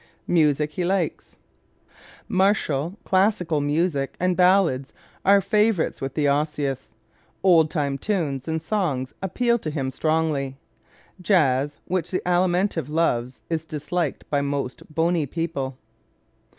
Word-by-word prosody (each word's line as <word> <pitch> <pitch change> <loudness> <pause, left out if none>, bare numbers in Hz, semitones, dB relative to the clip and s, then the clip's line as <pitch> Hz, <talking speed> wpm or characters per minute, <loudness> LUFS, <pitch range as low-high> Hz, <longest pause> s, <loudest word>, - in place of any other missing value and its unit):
Music 150 -3 +2
He 180 - -3
Likes 180 -2 -2 0.5
¶ - - -30 0.3
Martial, 185 -3 +1
classical 185 -5 +2
music 145 -1 0
and 180 0 +1
ballads 180 -8 +3 0.3
are 200 +1 +5
favorites 210 -3 +1
with 135 -1 -4
the 150 -2 +2
Osseous. 140 -2 -1 0.5
Old 165 -5 +5
time 140 -4 -1
tunes 150 -9 -2
and 160 0 -2
songs 155 -10 -1
appeal 235 +5 +1
to 160 - -4
him 135 -4 -2
strongly. 155 -3 0 0.6
Jazz, 145 -7 +2
which 175 -2 -2
the 185 - -2
Alimentive 180 -3 +1
loves, 130 -6 0
is 160 -2 -2
disliked 160 0 -3
by 145 -1 +2
most 140 -2 -3
bony 165 -1 +1
people. 140 -4 -3
160 Hz, 125 wpm, -24 LUFS, 140-180 Hz, 0.6 s, are